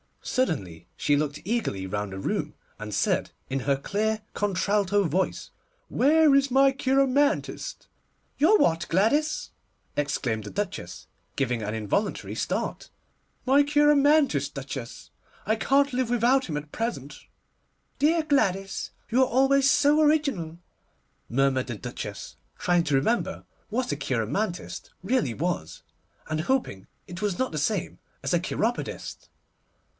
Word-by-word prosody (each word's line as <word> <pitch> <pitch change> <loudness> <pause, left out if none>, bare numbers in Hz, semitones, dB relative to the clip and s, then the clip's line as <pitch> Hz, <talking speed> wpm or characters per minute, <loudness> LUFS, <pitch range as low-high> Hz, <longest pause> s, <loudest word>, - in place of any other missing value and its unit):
Suddenly 120 - -2
she 145 - +2
looked 145 0 -2
eagerly 195 - -1
round 100 +1 -3
the 95 - -6
room, - - -2 0.3
and 105 0 -6
said, - - 0 0.2
in 135 0 -1
her 140 +1 +1
clear 215 +9 -1
contralto 205 0 +1
voice, 185 +3 -1 0.4
'Where 310 +1 +4
is 275 0 +3
my 270 +1 +5
cheiromantist?' 275 - 0 0.5
'Your 355 +9 +5
what, 165 - +2
Gladys?' 285 - +1 0.5
exclaimed 130 -6 -1
the 105 - -7
Duchess, - - -5 0.3
giving 125 -4 0
an 105 0 -3
involuntary 110 - -2
start. - - -3 0.6
'My 275 +2 +5
cheiromantist, 290 - +3
Duchess; 135 -3 -7 0.4
I 220 - +2
can't 275 +4 +2
live 250 -1 0
without 245 +3 +3
him 155 -4 -3
at 150 0 -7
present.' 185 - -4 0.8
'Dear 320 +3 +3
Gladys! 195 -10 0 0.2
you 245 +3 +3
are 260 - +4
always 270 +2 +4
so 295 +3 +4
original,' 280 - +1 0.7
murmured 130 +1 +1
the 120 -3 -5
Duchess, - - -7 0.2
trying 175 -1 +2
to 150 -3 +1
remember 225 - 0 0.3
what 245 0 -1
a - - 0
cheiromantist 140 - -3
really 220 - +1
was, 165 - -3 0.5
and 155 0 -1
hoping 170 - -1 0.2
it 175 0 -8
was 205 -4 -1
not 260 - -1
the 155 - -4
same 170 +6 -1 0.2
as - - -1
a 175 - +4
cheiropodist. 220 +7 -3
200 Hz, 130 wpm, -26 LUFS, -, 0.8 s, my